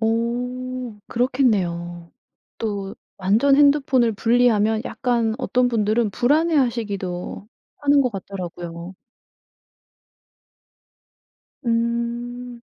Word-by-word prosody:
어 245 +1 -2
그렇겠네요. 180 -10 0 0.5
또 200 -3 -3 0.2
완전 220 +9 +3
핸드폰을 275 -5 +4
분리하면 225 -1 +2
약간 235 -3 0
어떤 250 -2 +1
분들은 220 -1 +1
불안해 305 - +2
하시기도 205 -8 -2 0.3
하는 285 -1 +4
것 250 -3 +1
같더라고요. 175 -3 -7 2.7
음. 235 +1 -2
235 Hz, 190 characters per minute, -22 LUFS, 205-250 Hz, 2.7 s, 핸드폰을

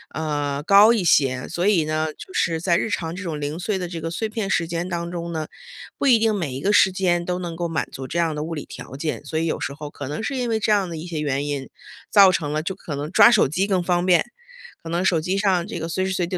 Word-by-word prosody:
呃， 145 -2 -2
高 200 +6 +7
一 210 -6 0
些。 130 -6 +2
所 175 +2 -2
以 190 -6 +4
呢， 155 0 -1
就 185 - -12
是 165 -1 0
在 170 0 +2
日 - - -1
常 170 -5 -3
这 195 - -6
种 160 -5 -4
零 150 +3 -4
碎 195 +2 -1
的 180 -1 -4
这 170 -2 -6
个 165 - -3
碎 220 +6 -2
片 215 -3 -4
时 170 -4 +1
间 170 +2 -3
当 170 -1 -3
中 170 -1 -5
呢， 155 -2 -3 0.5
不 280 - 0
一 245 -3 +7
定 220 -1 +2
每 160 -10 -3
一 135 - -5
个 200 +6 +1
时 190 - +5
间 180 -2 +1
都 180 0 -2
能 170 -2 -5
够 175 0 -2
满 165 -1 -2
足 130 0 -7
这 170 - -4
样 165 -2 +1
的 150 - -3
物 165 0 -4
理 150 - -6
条 135 - -10
件。 150 +2 -3
所 155 +2 -3
以 165 - 0
有 165 - -1
时 140 - -3
候 150 0 -8
可 140 - -7
能 150 +9 -4
是 275 - -2
因 245 -2 -1
为 220 -1 +1
这 215 - 0
样 200 -3 +2
的 165 - -6
一 155 - -7
些 165 -3 -4
原 145 -1 -1
因， 140 -2 -4 0.4
造 200 -3 +7
成 150 -4 -2
了 155 +1 -1
就 190 - -3
可 170 -5 -7
能 145 +3 -5
抓 205 +3 +8
手 215 - +4
机 180 +8 0
更 185 -3 +1
方 175 0 +1
便， 180 0 +4 0.6
可 165 - -8
能 175 +3 -1
手 165 -4 +2
机 185 +4 -1
上 190 -3 +1
这 - - -5
个 165 - -4
随 185 +3 -1
时 - - -2
随 180 -1 0
地 180 +1 -3
170 Hz, 315 characters per minute, -22 LUFS, 155-190 Hz, 0.6 s, 抓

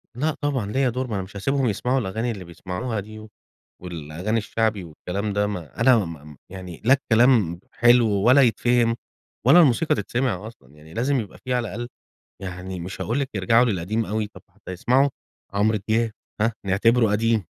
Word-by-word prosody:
لأ 150 +5 -1
طبعًا، 130 -8 -1
ليّا 135 +2 +2
دور 130 +2 -3
ما 110 - -3
انا 95 - -2
مش 95 - -13
هاسيبهم 135 +6 0
يسمعوا 125 +5 0
الأغاني 110 +3 -2
اللي 100 -5 -7
بيسمعوها 90 +6 -4
دي، 110 +2 -9 0.5
والأغاني 90 +5 -3
الشَّعبي 110 -2 -1
والكلام 95 +5 -4
ده، 105 0 +1
ما 90 -9 -6
أنا 130 -2 +6
ما 85 -8 -4
ما 75 -3 -13
يعني 90 -3 -9
لا 130 - +7
الكلام 115 -9 +3
حلو، 120 0 +5
ولا 115 +7 +5
يتفهم، 120 0 +3 0.5
ولا 150 +7 +8
الموسيقى 150 +2 +3
تِتسمِع 110 -1 -2
أصلًا، 70 - -15
يعني 75 +2 -15
لازم 130 +5 +1
يبقى 105 -5 -7
في 130 - -1
على 120 -2 0
الأقل 120 +4 -6 0.5
يعني 95 0 -6
مش 90 +3 -6
هاقول 120 +5 -1
لِك 135 -2 -2
يرجعوا 115 +5 +4
للقديم 110 +1 -1
أوي، 105 +2 -2
طب 95 -3 -15
حتَّى 100 0 -11
يسمعوا 130 +9 +2 0.4
عمرو 105 +2 +2
دياب 115 0 +2 0.3
ها، 115 +1 +2
نِعتبرُه 110 +3 +3
قديم، 110 -2 +1
110 Hz, 175 wpm, -23 LUFS, 95-120 Hz, 0.5 s, ولا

